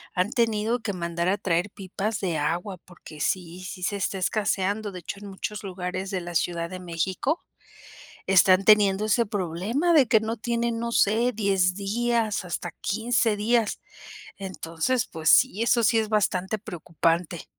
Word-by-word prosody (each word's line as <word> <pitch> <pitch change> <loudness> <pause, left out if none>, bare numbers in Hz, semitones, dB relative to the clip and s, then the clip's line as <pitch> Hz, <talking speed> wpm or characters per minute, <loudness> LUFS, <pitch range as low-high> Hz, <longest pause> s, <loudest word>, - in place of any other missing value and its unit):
,han 185 +4 +1
tenido 230 0 +1
que 225 -3 -3
mandar 170 -1 -2
a 195 +2 +2
traer 180 0 0
pipas 200 +2 -4
de 175 -4 -1
agua 175 +6 -2
porque 170 -3 -14
sí, 175 +3 -2
sí 185 0 -7
se 200 +3 -1
está 195 0 -2
escaseando, 205 +1 -1
de 180 - -7
hecho 180 +3 -7
en 205 - -9
muchos 210 +2 -5
lugares 185 0 -4
de 190 -2 -2
la 175 0 -7
Ciudad 170 0 -1
de 185 0 -7
México 185 - -2 0.9
están 190 0 +5
teniendo 205 -1 +5
ese 230 +2 +2
problema 205 - -1
de 285 -6 +6
que 220 0 +5
no 220 +1 -3
tienen, 235 +1 -1
no 235 0 -3
sé, 230 +3 +3
10 195 -4 +1
días 215 +1 0
hasta 175 -1 -4
15 225 +1 +1
días, 225 +1 +1 0.6
entonces 190 +4 -2
pues 160 -1 -1
sí 245 -1 +5
eso 235 0 +3
sí 225 +2 +4
es 220 -1 -2
bastante 200 -1 0
preocupante. 170 -3 -2
195 Hz, 165 wpm, -25 LUFS, 180-220 Hz, 0.9 s, de